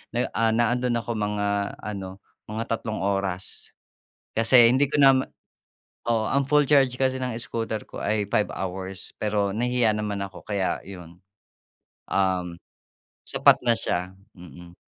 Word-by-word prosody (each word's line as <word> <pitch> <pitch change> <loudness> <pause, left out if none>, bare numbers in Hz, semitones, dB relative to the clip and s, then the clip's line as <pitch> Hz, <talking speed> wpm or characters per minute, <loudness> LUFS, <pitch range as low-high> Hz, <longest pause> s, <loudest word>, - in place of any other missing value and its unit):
na, 120 +1 0
ah, 115 - +1
naandon 120 +1 +1
ako 120 0 -2
mga 105 -2 -1
ano, 95 -2 -6 0.2
mga 110 +2 -3
tatlong 110 -4 -2
oras. 95 -2 -2 0.7
Kasi 115 +1 +6
hindi 135 +3 +3
ko - - 0
nama 135 -1 +6 0.9
oo. 115 -2 +2
Ang 140 0 +2
full 150 0 +4
charge 135 -4 +4
kasi 130 0 +1
ng 125 -3 -3
scooter 115 -3 -4
ko - - -8
ay 105 -1 0
5 105 - +2
hours, 95 0 -5
pero 105 -2 0
nahihiya 120 +1 +1
naman 105 -1 -3
ako, 95 -1 -10
kaya 100 -3 -1
'yon. 90 -3 -11 0.9
Um, 90 -3 0 0.7
sapat - - +5
na 120 - +5
siya, 90 +1 -2 0.2
mm. 90 0 -13
105 Hz, 140 wpm, -25 LUFS, 95-120 Hz, 0.9 s, Kasi